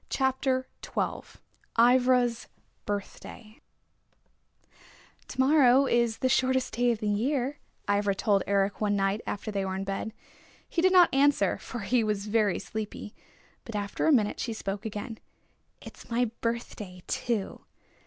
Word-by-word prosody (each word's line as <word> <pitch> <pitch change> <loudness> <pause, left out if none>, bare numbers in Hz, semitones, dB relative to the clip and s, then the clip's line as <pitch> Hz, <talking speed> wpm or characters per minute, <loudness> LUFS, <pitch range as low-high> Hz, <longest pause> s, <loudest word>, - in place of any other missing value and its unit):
CHAPTER 260 -1 0 0.2
XII - - -4 0.4
IVRA'S 245 0 +4 0.4
BIRTHDAY 210 +2 -6 1.7
"To - - -9
morrow 270 -1 +5
is 235 -3 +1
the 260 - 0
shortest 260 0 +1
day 245 +1 +2
in 235 - +1
the 210 - -4
year," 260 +6 0 0.3
Ivra 200 -1 +1
told 200 0 +2
Eric 200 +1 +1
one 205 -1 +1
night 195 +2 0
after 215 +2 -4
they 200 -1 -1
were 190 0 -3
in 190 - -3
bed. 195 +3 -4 0.6
He 335 - -1
did 370 +1 +4
not 360 -5 +6
answer, 280 +1 +3
for 245 - -7
he 240 +3 +1
was 210 -2 -1
very 210 -2 +1
sleepy. 215 -1 -6 0.5
But 230 - -8
after 205 +6 -2
a - - +5
minute 220 -7 +2
she 230 - -2
spoke 200 -1 -4
again. 220 +2 -6 0.6
"It's - - -12
my 235 -1 0
birthday 215 -6 -4
too!" 225 -5 -2
230 Hz, 145 wpm, -28 LUFS, 205-255 Hz, 1.7 s, not